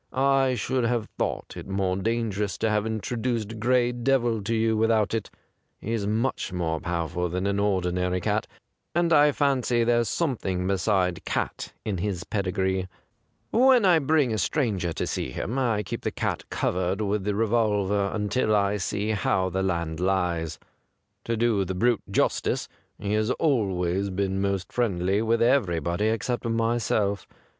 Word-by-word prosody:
I 135 -1 +2
should 125 +2 -1
have 115 -2 0
thought - - -2
it - - -8
more 95 -1 0
dangerous 105 -1 -1
to 110 - 0
have 105 0 +1
introduced 115 0 -2
Gray 120 +1 +2
Devil 120 -2 +1
to 115 +2 0
you 110 0 +2
without 110 -1 +2
it. 110 -3 -2 0.5
He's 110 -2 -2
much 110 0 -1
more 85 -3 -1
powerful 85 +1 -2
than 90 +3 -2
an 100 0 0
ordi 95 -3 +1
nary 90 0 0
cat, - - -1 0.5
and 170 -1 +3
I 150 -1 +6
fancy 130 -4 +1
there's 120 0 +2
some 160 -7 0
thing 90 -2 -2
beside 95 -2 +1
cat - - -3
in 100 -4 -2
his 95 -1 -2
pedigree. 95 -2 -1 0.6
When 250 -2 +5
I 175 -3 +6
bring 145 -4 +2
a 110 - -1
stranger 100 - 0
to - - -2
see - - -3
him 115 - -3
I 115 -5 +1
keep 90 - -5
the - - -1
cat - - -3
covered 90 +2 -1
with 105 -1 0
the 105 0 -1
revolver 105 -3 +1
until 110 +1 +1
I 100 0 +2
see 105 +3 -2
how 95 -2 +1
the 95 +2 -1
land 85 -4 -1
lies. 90 -4 0 0.7
To 115 -1 -1
do 115 -3 +2
the 95 0 -4
brute 120 +3 +2
justice, - - 0 0.3
he 105 0 -3
has 110 +1 +1
always 100 - 0
been 95 0 -1
most 100 -2 -1
friendly 100 -4 +1
with 115 +1 +2
everybody 90 - +1
except 115 +2 -1
myself. 115 -3 0
105 Hz, 160 wpm, -26 LUFS, 95-120 Hz, 0.7 s, I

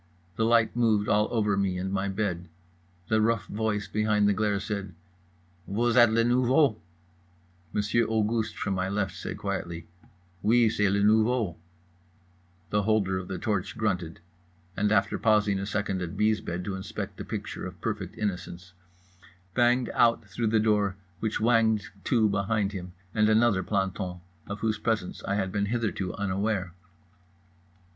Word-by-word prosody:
The 110 - +1
light 115 -1 +3
moved 110 -4 +2
all 105 +1 +3
over 105 -3 +1
me 95 -2 0
and 95 +1 -3
my 100 0 0
bed. 95 -4 -2 0.6
The 110 0 +3
rough 115 0 +1
voice 105 -1 -2
behind 105 0 +2
the 105 - +4
glare 105 -1 0
said: 100 -3 -5 0.7
"Vous 115 +4 +1
êtes 120 -2 +7
le 115 +1 +3
nouveau?" 125 - +3 0.9
Monsieur 105 +3 +1
Auguste, 110 0 0
from 95 - -1
my 95 0 -1
left, 95 -2 -1
said - - -6
quietly: 85 -1 -4 0.6
"Oui, 115 +2 +4
c'est 105 -3 +2
le 100 +1 +1
nouveau." 110 -3 +3 1.2
The 105 - +2
holder 100 -3 +1
of 90 - -8
the 95 - -4
torch 95 -1 -2
grunted, 90 -7 -2 0.6
and 105 0 +1
(after 100 -1 +2
pausing 105 -3 +3
a 100 - -4
second 100 -2 -2
at 90 +2 -5
B.'s 105 0 +2
bed 90 -2 -4
to 100 - -3
inspect 95 -1 -6
a - - -3
picture - - -5
of 90 -1 -11
perfect 105 0 -4
innocence) 90 -3 -4 0.8
banged 125 +1 +2
out 115 -1 +3
through 115 -2 -2
the 110 0 +3
door 105 -3 +2 0.2
which 110 -1 -1
whanged 110 -3 +2 0.2
to 115 -3 +3
behind 100 0 0
him 90 -3 -7 0.2
and 110 -1 +3
another 110 -3 +4
planton, 95 -2 -2 0.3
of 100 0 -6
whose 110 -2 0
presence 110 -6 -2
I 100 - 0
had 95 -2 -1
been 100 0 0
hitherto 105 -5 -2
unaware. 100 -2 -1
105 Hz, 155 wpm, -27 LUFS, 95-110 Hz, 1.2 s, êtes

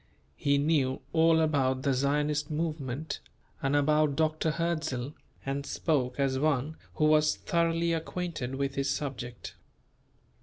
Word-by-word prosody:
He 140 -1 +2
knew 140 -3 +1
all 165 0 +5
about 135 -4 +1
the 140 - +2
Zionist 145 +2 0
movement 155 -2 -3 0.4
and 140 +1 +1
about 150 0 +3
Dr. 155 +1 +1
Hertzl 155 -5 -2 0.3
and 140 +1 -2
spoke 140 -4 -1
as 135 -1 +1
one 150 0 0 0.2
who 155 - +2
was 155 0 +4
thoroughly 170 -1 +1
acquainted 165 -5 -3
with 140 0 -1
his 140 0 -1
subject. 130 -4 -4
150 Hz, 125 wpm, -29 LUFS, 135-160 Hz, 0.4 s, all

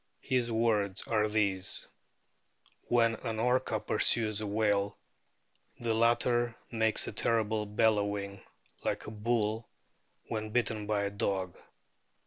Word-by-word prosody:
His 125 -2 0
words 105 -4 +1
are 110 -2 +2
these: 100 -3 0 1.0
"When 115 -1 +3
an 110 0 -4
Orca 125 -1 +1
pursues 110 0 +2
a 105 - -3
whale 100 -1 +1 0.8
the 115 -1 0
latter 120 +1 +2 0.2
makes 110 -1 +2
a - - -3
terrible 110 -2 0
bellowing, 100 -2 0 0.4
like - - -2
a - - -6
bull 110 0 -1 0.6
when 110 -1 -3
bitten 110 -2 0
by 105 -1 +1
a 100 - -2
dog." 95 -3 -2
110 Hz, 115 wpm, -31 LUFS, 105-115 Hz, 1.0 s, When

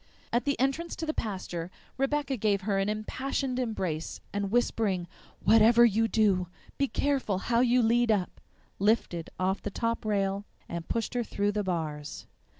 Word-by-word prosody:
At 240 - +2
the 280 -1 0
entrance 275 +6 0
to 320 - -4
the 310 - -1
pasture 185 - -4 0.3
Rebecca 275 0 0
gave 205 -4 +1
her 195 0 0
an 195 +1 +1
impassioned 255 +4 -2
embrace, 185 -10 -2
and 200 -1 -1
whispering, 205 -5 +1 0.4
"WHATEVER 225 +3 +7
YOU 225 0 +3
DO, 200 -5 +2 0.3
BE 275 - +3
CAREFUL 270 -9 0
HOW 235 +4 +1
YOU 250 0 +4
LEAD 235 +1 +3
UP," 195 -4 -1 0.4
lifted 195 -5 +1
off 190 +1 0
the - - -3
top 230 +3 -2
rail 200 -1 0 0.2
and 170 -1 -6
pushed 230 -1 -1
her 245 -1 0
through 205 -2 0
the 210 0 -1
bars. 155 -5 -4
215 Hz, 160 wpm, -29 LUFS, 195-240 Hz, 0.4 s, WHATEVER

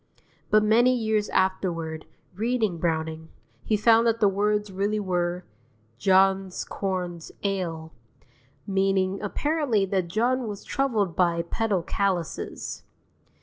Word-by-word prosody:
But 215 0 +5
many 240 +4 +4
years 220 -2 0
afterward, 175 -4 -1 0.3
reading 215 -3 -1
Browning, 160 -1 -2 0.3
he 215 - +1
found 230 +2 +5
that 230 0 +1
the 210 - +5
words 210 +1 0
really 200 +3 -1
were: 180 -2 -1 0.6
"John's 190 +2 +2
corns 180 -4 -4
ail," 170 -5 -3 0.7
meaning 195 0 +1
apparently 265 -1 0
that 190 -2 -1
John 240 +6 0
was 205 -1 -6
troubled 220 -10 0
by 170 -2 +2
pedal 200 0 -1
callouses.) 185 -3 -2
195 Hz, 110 wpm, -26 LUFS, 175-215 Hz, 0.7 s, But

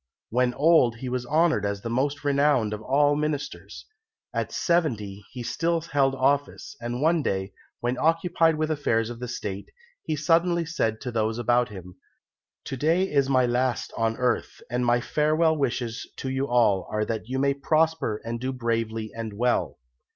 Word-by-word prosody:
When 125 +1 +1
old 145 -6 +4
he 125 +2 -6
was 125 -1 -3
honoured 155 -6 +2
as 100 -1 -2
the 115 - -3
most 140 +4 -1
renowned 140 -6 +2
of 105 - -5
all 145 +4 +3
ministers. 150 -1 -4 0.5
At - - -2
seventy 110 - 0
he 125 -1 -7
still 165 +7 0
held 140 -4 +1
office, 140 +2 0
and 120 +3 -3
one 165 +1 +3
day, 95 -6 -2 0.3
when 120 +1 -1
occupied 165 0 +2
with 155 0 -1
the - - +2
affairs 115 -6 0
of 120 +1 -8
State, 100 -4 -5 0.3
he 155 - -2
suddenly 170 +3 +2
said 115 -9 -1
to 125 - -4
those 110 -1 0
about 120 +1 +2
him, 90 -3 -10 0.7
"To - - -4
day 170 +7 +1
is 140 -2 +2
my 130 -2 +4
last 125 0 -1
on 115 0 0
earth, 125 -1 -1
and 125 0 0
my 120 0 +3
farewell 155 +4 +2
wishes 120 -5 -2
to 130 - -4
you 135 +1 -1
all 115 -7 +2
are 105 0 -1
that 110 +1 -4
you 130 - -2
may 140 +1 +2
prosper 155 -5 +1
and 115 0 -3
do 130 +2 -2
bravely 115 -3 -2
and 115 -2 -5
well." 120 +4 0
125 Hz, 175 wpm, -26 LUFS, 115-150 Hz, 0.7 s, old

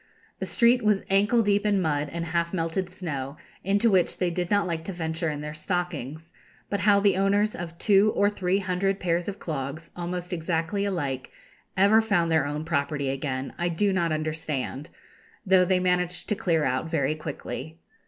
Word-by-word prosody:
The - - -3
street 240 +1 +4
was 210 -2 +2
ankle 205 +4 +4
deep 205 0 +2
in 205 -2 +2
mud 150 -4 0
and 170 0 -3
half 170 +2 -1
melted 170 +2 -1
snow, 145 -6 -5 0.3
into 200 +4 +2
which 185 -3 +2
they 180 -2 0
did 175 0 -2
not 205 -1 +2
like 165 -2 -3
to 195 - -4
venture 165 -1 -2
in 150 -1 -4
their 150 0 -5
stockings; 160 -2 -4 0.4
but 200 - 0
how 200 +1 +4
the 200 -1 +3
owners 205 +2 +2
of 170 -1 -7
two 205 +2 +4
or 200 - +4
three 195 -2 0
hundred 195 0 -1
pairs 175 +1 0
of 200 - -6
clogs, 155 -1 -5
almost 180 +1 -4
exactly 170 +4 -1
alike, 140 -10 -2 0.5
ever 200 +4 +6
found 175 -7 +1
their 155 -3 +3
own 150 +2 -4
property 140 -3 -1
again 135 -1 -3
I 175 0 +1
do 195 +4 +1
not 170 -3 +1
understand, 155 -2 -3 0.6
though 185 -1 +5
they 185 0 +2
managed 180 -1 0
to 210 - +2
clear 165 -5 +1
out 130 +5 -1
very 145 -3 +1
quickly. 155 0 -6
175 Hz, 185 wpm, -26 LUFS, 155-195 Hz, 0.6 s, ever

